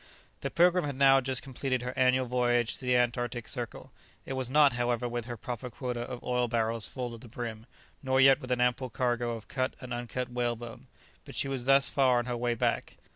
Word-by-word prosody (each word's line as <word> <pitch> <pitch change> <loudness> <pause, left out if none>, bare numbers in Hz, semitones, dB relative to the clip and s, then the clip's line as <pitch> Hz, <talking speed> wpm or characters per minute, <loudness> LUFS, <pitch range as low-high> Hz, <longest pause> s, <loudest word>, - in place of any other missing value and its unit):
The - - -3
"Pilgrim" 180 +1 +4
had 145 -2 -3
now 135 0 +6
just 130 0 -1
completed 130 -1 -2
her 125 0 -4
annual 130 0 +3
voyage 120 -1 +1
to 130 - -9
the 125 0 +3
Antarctic 120 -1 -1
circle. 120 -4 -6 0.3
It - - -4
was 130 -2 -2
not, 145 0 +5
however, 120 0 0
with 120 -1 -4
her 120 -1 -6
proper 125 +2 -5
quota 125 +1 -4
of 120 0 -6
oil 125 -1 0
barrels 115 -1 0
full 125 -2 -5
to 115 - -9
the 120 - -12
brim, 115 0 -6 0.3
nor 130 -1 +1
yet 135 +2 +6
with 130 - -8
an 125 -1 +1
ample 125 +1 +1
cargo 120 -1 -1
of 115 -1 -8
cut 130 -1 -2
and 125 -1 -6
uncut 120 +1 -4
whalebone, 120 -1 -3 0.4
that - - -10
she - - +1
was 135 -3 -2
thus 135 +1 +5
far 130 -3 +3
on 120 - 0
her 125 -1 -2
way 120 0 0
back. - - -1
125 Hz, 220 wpm, -29 LUFS, 120-130 Hz, 0.4 s, now